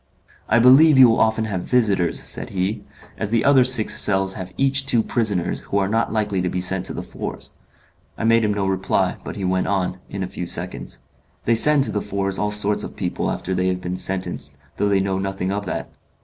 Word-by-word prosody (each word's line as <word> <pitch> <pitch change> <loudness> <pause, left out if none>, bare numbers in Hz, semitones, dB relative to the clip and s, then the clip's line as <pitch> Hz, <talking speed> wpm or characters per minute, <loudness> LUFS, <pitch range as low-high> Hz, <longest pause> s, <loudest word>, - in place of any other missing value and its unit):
"I 115 - +4
believe 135 +5 +6
you 130 -1 +9
will 115 - +1
often 110 0 +1
have 95 -5 -3
visitors," 100 -7 +1
said - - -5
he, 95 +3 -3 0.4
"as 105 - -2
the 115 0 0
other 140 -2 +5
six 125 -4 +4
cells 95 -1 +1
have 95 -1 -8
each 135 0 +1
two 115 -4 +3
prisoners, 105 -9 -1
who 100 - -4
are 95 -1 +1
not 115 +3 -1
likely 105 -4 -1
to 90 - -1
be 90 - -3
sent 95 0 +1
to - - -5
the - - -5
Fours." - - -7 0.7
I - - -5
made 115 0 +3
him 105 - +1
no 100 -1 -2
reply, 95 0 -1
but - - -7
he 100 - -4
went 95 0 0
on, 95 -1 -2
in 100 -1 -5
a - - -4
few 90 -1 -6
seconds, - - -4 0.4
"They 115 - +3
send 145 +5 +6
to - - +2
the 105 - -2
Fours 100 -1 -2
all 105 - 0
sorts 105 0 +2
of - - -8
people - - -3
after 95 - -4
they 90 0 0
have 90 0 -2
been 90 0 -4
sentenced, 90 -7 -4 0.2
though 105 - 0
they 100 -1 +2
know 95 -1 -2
nothing 95 -1 -3
of 100 -1 -4
that. - - -4
100 Hz, 225 wpm, -21 LUFS, 95-115 Hz, 0.7 s, you